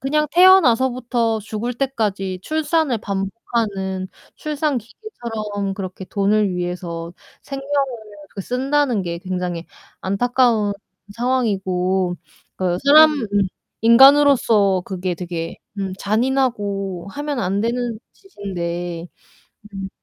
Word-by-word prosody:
그냥 300 +3 +1
태어나서부터 255 - +4
죽을 220 +3 -4
때까지 205 -8 -2
출산을 310 -5 0
반복하는 195 -1 -3 0.3
출산 300 -2 -1
기계처럼 220 - -5
그렇게 190 -1 -6
돈을 200 -1 +1
위해서 175 -1 -4 0.3
생명을 275 0 -7 0.7
그 195 - -5
쓴다는 260 -1 +1
게 170 -1 -4
굉장히 180 -2 -4 0.4
안타까운 225 0 +2 0.4
상황이고 190 -7 0 0.4
그 180 -1 0
사람 310 +2 +8
음 270 -7 -2 0.6
인간으로서 235 -6 +6
그게 185 -1 -3
되게 170 -1 -5 0.2
음 195 -1 -2
잔인하고 205 -5 -1
하면 290 +3 -4
안 195 +1 0
되는 235 0 -1
짓인데. 175 - -5 0.7
음. 195 0 -5
215 Hz, 240 characters per minute, -20 LUFS, 190-260 Hz, 0.7 s, 사람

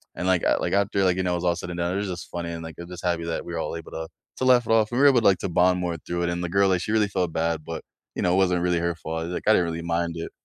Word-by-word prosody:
and, 90 - -3
like 95 -2 +2 0.2
like, - - -1
after, 100 0 +2
like, 90 -1 +3
you 95 - 0
know, 90 - 0
it - - +1
was 90 - -4
all 85 -1 +2
said 90 - -6
and 85 - -5
done, 85 +1 0
it - - -1
was - - -4
just 85 - -9
funny, 85 -1 -4
and, 85 0 -6
like, 80 -1 -8
I'm 85 +1 -8
just 90 0 -8
happy 85 -1 0
that - - -3
we're 85 -1 -4
all 85 - -3
able 80 - -10
to 80 0 -5 0.3
to 130 - -1
laugh 125 -2 +5
it - - 0
off, 110 0 +3
and 120 - 0
we - - +4
were 145 - +9
able 125 -4 +4
to, - - -3
like, 95 - +4
to - - -3
bond 90 +1 +3
more 85 -2 -2
through 85 0 -2
it, 85 - 0
and 85 0 -2
the 85 - -2
girl, 100 +1 +3
like, 90 -2 +2
she 105 - -3
really 105 -2 +3
felt 90 -4 0
bad, 80 -1 -1
but, 80 -1 -6 0.3
you - - -2
know, 90 0 +2
it - - +3
wasn't 90 -2 +2
really 90 -1 +1
her 85 0 -1
fault, 80 0 -4
like, 90 - -4
I - - +7
didn't 90 - +3
really 85 0 -4
mind 85 0 -1
it. 80 - -5
90 Hz, 370 wpm, -25 LUFS, 85-95 Hz, 0.3 s, were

